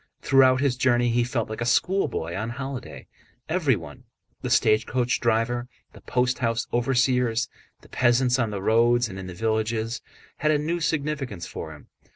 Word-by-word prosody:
Throughout 130 -1 +5
his 135 -3 +1
journey 120 -1 +2
he 120 +1 +2
felt 120 -1 -2
like 110 +2 -6
a - - 0
schoolboy 120 - 0
on 110 +4 -3
holiday. 135 +1 -6 0.4
Everyone—the 130 - -3
stagecoach 120 +3 +2
driver, 120 +1 0 0.3
the - - -14
post 125 0 0
house 115 -3 0
overseers, 125 -1 +1 0.3
the - - -19
peasants 125 +1 +2
on 115 -3 +1
the 100 -2 -5
roads 120 +2 +3
and 95 - -7
in 95 - -7
the 90 - -8
villages—had 110 +7 -3
a 155 - +4
new 160 +4 -2
significance 145 - -2
for - - -7
him. - - -17
120 Hz, 155 wpm, -25 LUFS, 115-130 Hz, 0.4 s, Throughout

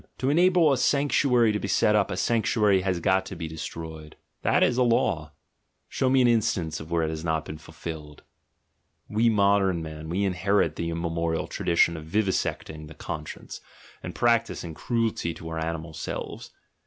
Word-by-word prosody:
^ - - -26
To 135 +2 0
enable 175 -2 +4
a 130 - 0
sanctuary 135 -5 +3
to 105 - -1
be 100 - -4
set 105 +2 +3
up 105 -2 +2
a 95 - -3
sanctuary 105 -2 +2
has 90 -2 -1
got 95 +2 +2
to 95 - -7
be 80 -1 -5
de 80 - -9
stroyed: 80 -1 -7 0.3
that - - +3
is 125 - +2
a - - +3
law 85 -11 +1 0.3
— - - -49
show 130 - 0
me 130 0 +4
an - - +5
instance 110 -10 0
where 85 +1 -1
it 80 - -1
has 80 0 -5
not 80 -2 -1
been 75 - -8
fulfilled!... 80 -2 -9 0.8
We 110 +2 +2
modern 100 -4 +2
men, 80 0 -8
we 95 +4 0
inherit 95 -3 +1
the 85 - -3
immemorial 85 0 -2
tradition 85 -1 +1
of 80 - -8
vivisecting 80 -4 -2
the 80 - -12
conscience, 75 0 -7 0.4
and - - -7
practising 115 -8 +1
cruelty 115 -4 -1
to 80 - -8
our 80 0 -4
animal 80 0 -4
selves. 75 - -6
90 Hz, 180 wpm, -26 LUFS, 80-110 Hz, 0.8 s, an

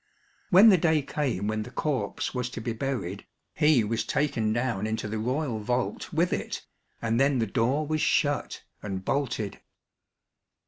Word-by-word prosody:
When 195 +4 +8
the 190 -4 +6
day 160 -3 +3
came 130 -9 -2
when 110 0 -1
the 110 - -6
corpse 130 -6 -2
was 125 -1 -2
to 120 - -6
be 115 +1 -3
buried, 115 -6 -4 0.3
he 150 -6 +4
was 110 +2 -1
taken 130 -7 0
down 115 -3 -1
into 110 -1 -2
the 110 +1 -3
royal 125 0 -1
vault 120 +9 -2
with 170 +2 +1
it - - -4 0.4
and 115 +1 +1
then 135 0 +3
the 115 - +1
door 125 +8 +1
was 155 +1 -1
shut 145 -1 +1 0.2
and 95 -2 -5
bolted. 125 -7 -1
125 Hz, 165 wpm, -27 LUFS, 110-145 Hz, 0.4 s, When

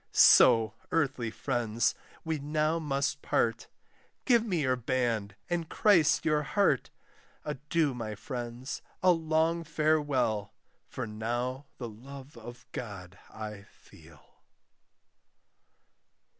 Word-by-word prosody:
So, 110 -2 +7 0.2
earthly 135 -8 0
friends, 115 0 0 0.3
we 160 -2 -1
now 155 +3 0
must 140 -3 -1
part: - - 0 0.6
Give 235 -4 +4
me 185 -8 -1
your 130 -2 +2
band, 115 -5 -1
and 170 -2 -2
Christ 180 -8 +4
your 155 -2 +2
heart. 150 - +1 0.6
Adieu, 150 0 0
my 110 -3 -5
friends, 120 +2 -6 0.2
a 185 - +7
long 165 0 +1
farewell 145 -9 0 0.3
For - - -5
now 120 +5 -3
the 120 - -5
love 135 +5 -11
of 120 +1 -11
God 100 -5 -7
I 105 -2 -7
feel. - - -20
135 Hz, 105 wpm, -30 LUFS, 115-155 Hz, 0.6 s, So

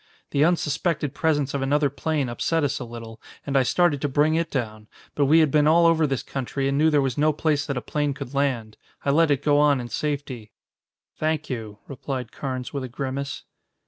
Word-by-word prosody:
The 140 - +3
unsuspected 155 -2 0
presence 145 -3 0
of 140 - -1
another 145 +1 +1
plane 150 -1 -1
upset 160 +7 -1
us 145 - -1
a 125 - -5
little, 115 -1 -10 0.2
and 140 - -3
I 135 - +6
started 145 +3 +2
to 145 - 0
bring 150 +3 +2
it 165 +1 0
down. 110 -6 -4 0.3
But 145 - +2
we 160 +3 +6
had 155 -3 +2
been 150 0 +4
all 170 +2 +5
over 165 -2 +4
this 135 -3 -2
country 135 +1 -3
and 135 - 0
knew 155 +3 +4
there 145 -2 +3
was 135 0 -2
no 155 +1 +4
place 150 -1 0
that 140 - -2
a - - -2
plane 145 -2 -1
could 140 -2 -7
land. 130 -6 -1 0.3
I 140 - +3
let 165 +2 +4
it 145 -1 +1
go 145 -1 +3
on 145 -2 +4
in 120 -1 -6
safety." 135 -6 -4 0.6
"Thank 155 -2 -1
you," 110 -4 -5
replied 130 -3 -5
Carnes 130 -2 -5
with 140 -2 -3
a 130 - -5
grimace. 135 +2 -4
140 Hz, 215 wpm, -24 LUFS, 130-150 Hz, 0.6 s, I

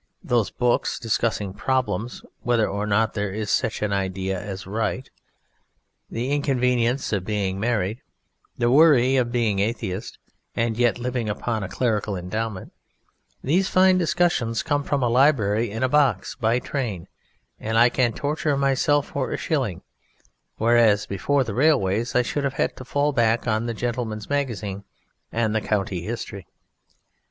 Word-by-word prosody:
Those 120 -4 +1
books 120 -1 0
discussing 110 -3 -1
Problems: 120 0 -2 0.2
whether 120 -3 +2
or 100 +1 -3
not 110 +1 +2
there 105 -2 -2
is 105 0 -3
such - - 0
an 105 -1 0
idea 95 -1 -2
as 100 -2 -6
right; 115 +6 -2 1.0
the 120 +4 -3
inconvenience 125 -3 +1
of 100 -3 0
being 100 -2 -2
married; 110 0 -1 0.6
the 120 0 +2
worry 135 -3 +5
of 125 -2 +1
being 115 -5 +1
Atheist 105 -1 -3 0.4
and 115 -1 0
yet 120 0 +2
living 120 -2 -2
upon 110 +2 -2
a 95 - -4
clerical 105 -3 -1
endowment, 100 +3 -4 0.7
these 180 +8 +2
fine 185 0 +4
discussions 170 -10 +1
come 145 0 0
from 140 -2 -1
a - - +3
library 115 -4 +3
in 110 +5 -3
a - - +4
box 130 -8 +2
by 115 -1 +1
train 120 - -4 0.5
and 110 +1 -1
I 120 +2 +6
can 120 -1 +1
torture 145 +2 -1
myself 140 +1 +2
for - - -2
a - - -2
shilling, - - -2 0.7
whereas, 115 -3 +4
before 135 +8 0
the 115 -4 -5
railways, 120 -5 +2
I 125 - +4
should 140 +4 -2
have 140 -1 -1
had - - 0
to 130 - -9
fall 145 +3 +1
back 120 -2 +2
on 110 +1 0
the 115 - -3
Gentleman's 115 -1 -3
Magazine 110 -8 -2 0.5
and 110 -2 0
the 110 - +1
County 95 -4 -1
History. 100 -1 -6
115 Hz, 155 wpm, -24 LUFS, 105-130 Hz, 1.0 s, I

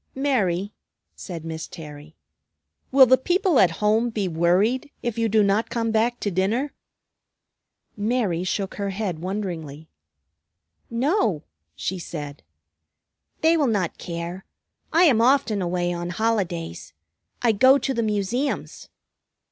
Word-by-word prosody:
"Mary," 205 -9 0 0.4
said 170 -4 -7
Miss 160 0 -5
Terry, 150 -1 -11 0.8
"will 265 0 +8
the 260 +1 +4
people 355 - +2
at 185 - +6 0.2
home 220 +3 +3
be 210 -4 -2
worried 185 - +1
if 235 -1 -2
you 225 -1 +1
do 215 0 +4
not 200 +3 +1
come 230 -1 -1
back 230 +2 +1
to 205 - -1
dinner?" 215 +10 0 1.2
Mary 210 -5 0
shook 190 +1 -2
her 200 - -1
head 190 -4 -3
wonderingly. 170 -5 -5 1.0
"No," 235 - +1 0.3
she 190 0 -3
said. 150 -4 -7 1.0
"They 325 +1 +4
will 300 -4 +2
not 200 -7 -1
care. 170 +2 -5 0.5
I 335 +3 +5
am 255 -10 +5
often 240 -5 +3
away 175 0 -1
on 175 0 -4
holidays. 175 - -2 0.5
I 235 - +5
go 260 +6 +6
to 270 0 -2
the 235 - 0
Museums." 215 +6 -2
205 Hz, 130 wpm, -24 LUFS, 175-240 Hz, 1.2 s, will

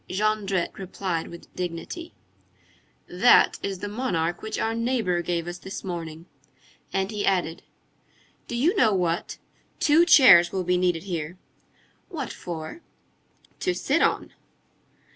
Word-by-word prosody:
Jondrette 200 -2 0
replied 185 -3 -3
with 170 - -13
dignity:— 180 - -6 0.9
"That - - +4
is 195 -1 -3
the 205 - -3
monarch 190 -7 -2
which 220 0 -4
our 225 - -1
neighbor 230 -7 0
gave 175 -1 -2
us 175 0 -6
this 190 - -7
morning." 165 -3 -6 0.7
And 195 +2 -1
he 210 -1 -3
added:— 175 -4 0 0.9
"Do 240 - -4
you 310 - +2
know 220 - +4
what? 175 -2 -1 0.4
Two 310 +2 +5
chairs 190 - +8
will 190 -1 -2
be 180 +1 +1
needed 180 -2 +1
here." 175 -2 -5 0.7
"What 295 - -5
for?" 165 - -7 0.8
"To 365 -1 0
sit - - +1
on." - - 0
190 Hz, 130 wpm, -25 LUFS, 175-225 Hz, 0.9 s, chairs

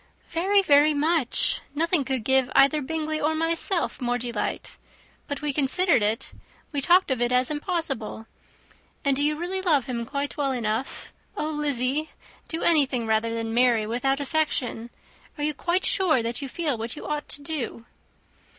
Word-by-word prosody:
"Very, 390 +5 +2
very 295 -2 +5
much. 300 -3 +1
Nothing 330 0 +2
could 260 -3 -2
give 265 +1 +3
either 280 +3 +5
Bingley 310 +2 -3
or 315 +2 +1
myself 330 +1 0
more 245 0 0
delight. 235 -3 -4 0.5
But 285 +1 -5
we 295 -2 -1
considered 295 - +3
it, 215 +2 0 0.4
we 285 -3 -1
talked 355 +1 +4
of 255 -2 0
it 240 0 +1
as 250 +2 +3
impossible. 295 - -2 0.8
And 280 -1 +3
do 285 - +1
you 300 +1 +2
really 360 +4 -3
love 310 -8 +2
him 235 -3 -4
quite 280 +1 -3
well 275 -2 0
enough? 230 +1 -3 0.2
Oh, 305 +1 -2
Lizzy! 290 0 -1 0.4
do 325 - -4
anything 275 -7 +3
rather 220 +1 +1
than 225 0 -3
marry 240 -2 +3
without 270 +5 0
affection. 280 -6 -1 0.5
Are 295 - -4
you 300 0 0
quite 350 +5 -1
sure 320 - +2
that 235 +4 -3
you 275 - -5
feel 295 -5 -2
what 225 +1 -4
you - - -9
ought 300 -1 -4
to 290 - -6
do?" 280 -6 -4
285 Hz, 170 wpm, -25 LUFS, 245-315 Hz, 0.8 s, very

